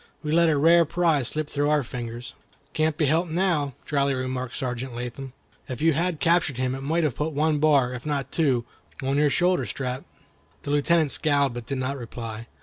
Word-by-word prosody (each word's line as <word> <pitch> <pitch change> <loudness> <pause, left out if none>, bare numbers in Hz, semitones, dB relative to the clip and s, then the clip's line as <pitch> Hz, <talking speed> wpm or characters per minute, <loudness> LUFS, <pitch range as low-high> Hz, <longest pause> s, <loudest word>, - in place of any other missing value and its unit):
We 150 - -2
let 170 +1 +4
a 150 - +2
rare 165 +4 +6
prize 160 -5 +1
slip 155 -1 -3
through 145 0 0
our 150 -2 +2
fingers." 120 0 -6 0.4
"Can't 155 0 +1
be 160 - +2
helped 165 +5 +1
now," 160 -5 0
dryly 140 -2 +1
remarked 130 -1 -3
Sergeant 125 -2 -4
Latham. 125 +2 -6 0.4
"If 125 -2 -5
you 165 +1 +3
had 170 +1 -1
captured 165 -6 +2
him 130 0 0
it 135 - -5
might 160 +5 0
have 150 -5 +1
put 150 +5 -3
one 150 +1 +1
bar, 140 -5 +3
if 125 -1 -7
not 140 -3 -2
two, 130 -7 +1 0.4
on 135 +1 0
your 150 0 +4
shoulder 175 -3 +1
strap." 125 +4 -3 0.6
The 145 - -3
Lieutenant 150 +1 +3
scowled, 140 -4 +2
but 120 -1 -7
did 135 - -2
not 130 +2 -2
reply. 115 -1 -7
140 Hz, 200 wpm, -25 LUFS, 130-155 Hz, 0.6 s, rare